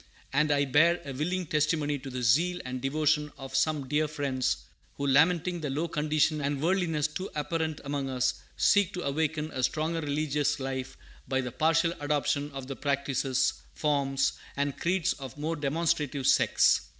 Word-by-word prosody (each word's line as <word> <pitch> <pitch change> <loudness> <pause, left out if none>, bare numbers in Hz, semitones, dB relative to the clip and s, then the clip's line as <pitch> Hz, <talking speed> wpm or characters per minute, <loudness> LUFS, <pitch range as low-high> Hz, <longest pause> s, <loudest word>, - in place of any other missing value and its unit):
And 150 +2 +3
I 140 0 +3
bear 165 +6 +4
a 140 - -5
willing 180 +7 -1
testimony 150 -1 0
to 135 - -8
the 125 -1 -4
zeal 170 +10 +3
and 125 0 -4
devotion 150 +2 +1
of 135 0 -7
some 150 -4 +1
dear 150 +3 +1
friends, 130 - -1 0.3
who, 140 - -3
lamenting 165 +5 +3
the 150 - -2
low 150 +5 -1
condition 155 0 +1
and 140 0 -1
worldliness 165 -2 +1
too 185 +5 -5
apparent 160 +1 -2
among 140 -1 -2
us, 125 -1 +1 0.2
seek 205 -1 +3
to 180 - -4
awaken 155 +2 -1
a 130 - -3
stronger 160 +5 0
religious 145 0 0
life 130 -1 -4 0.3
by 130 - 0
the 125 -2 -3
partial 165 +5 +2
adoption 145 0 0
of 135 -1 -6
the 135 +1 -6
practices, 140 -2 0 0.2
forms, 140 -2 +1 0.2
and 140 -1 -1
creeds 175 -1 +1
of 135 -1 -9
more 155 +3 -2
demonstrative 150 -2 -1
sects. - - +4
145 Hz, 165 wpm, -29 LUFS, 135-160 Hz, 0.3 s, bear